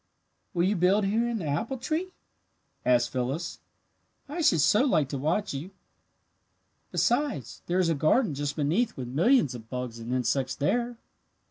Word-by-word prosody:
"Will 170 - +2
you 195 +3 +2
build 190 +3 +3
here 225 +4 +1
in 235 - -1
the 180 - -4
apple 220 - -2
tree?" 320 +9 -2 0.7
asked 120 -1 +3
Phyllis. 135 +7 -3 0.7
"I 315 +5 -4
should 170 - +4
so 210 - +4
like 155 - +2
to 140 - -3
watch 170 +8 0
you. 145 +7 -5 1.2
Besides, 240 - 0
there 175 - 0
is 185 -2 +3
a - - +3
garden 155 - +2
just 145 +1 -3
beneath 175 +11 0
with 130 -2 -4
millions 165 - +3
of 115 -2 -10
bugs 125 -2 -5
and 115 +1 -6
insects 130 +1 0
there." 240 +11 0
165 Hz, 160 wpm, -28 LUFS, -, 1.2 s, should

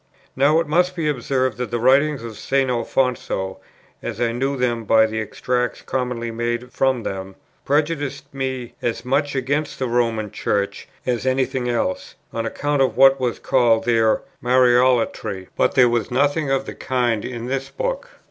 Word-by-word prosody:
Now 145 +4 +4
it 165 - 0
must 180 +4 +1
be 165 -3 -1
observed 130 -3 -1
that 125 -3 -2
the 120 - -2
writings 135 +2 +3
of 115 -2 -7
St. 135 +1 0
Alfonso, 120 -6 -1 0.4
as - - -5
I 120 -1 +1
knew 135 +4 -1
them 120 -2 0
by 110 +1 +5
the 110 0 -3
extracts 125 +3 -2
commonly 125 -2 -2
made 120 +2 -3
from 130 -3 +1
them, 95 -1 -5 0.3
prejudiced 145 -1 0
me 130 -3 -4
as 120 0 -2
much 140 +2 0
against 140 +3 -1
the 130 - -1
Roman 115 -3 0
Church 100 -1 -2 0.2
as 125 0 -1
any 130 0 +2
thing 130 -2 -3
else, 115 -6 -2 0.2
on 115 0 -2
account 145 +3 -1
of 130 -2 +1
what 135 +1 +6
was 125 -2 -1
called 115 -3 +2
their 115 -2 +2 0.2
"Mariolatry;" 125 -6 +2
but - - +1
there 125 -2 +6
was 120 -3 0
nothing 145 0 +1
of 135 0 +1
the - - -6
kind 120 -4 -1
in 120 -2 -5
this 135 +1 -3
book. - - -3
125 Hz, 170 wpm, -21 LUFS, 115-135 Hz, 0.4 s, what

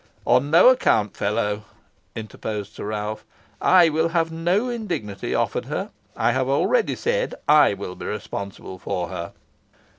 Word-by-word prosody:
"On 125 +4 +3
no 170 +10 +7
account, 105 - +2
fellow," 105 0 -1 0.5
interposed 110 -1 -6
Sir - - -7
Ralph. 105 0 -4 0.4
"I 180 -3 +6
will 160 +2 +1
have 165 -1 0
no 175 +8 0
indignity 180 - -3
offered - - -1
her. - - -4 0.3
I - - +2
have 130 0 0
already 445 - +2
said - - -1
I 150 -9 +6
will 95 -2 -6
be - - -8
responsible 100 -2 -6
for 90 -1 -3
her." 85 +1 -6
125 Hz, 145 wpm, -23 LUFS, 105-170 Hz, 0.5 s, no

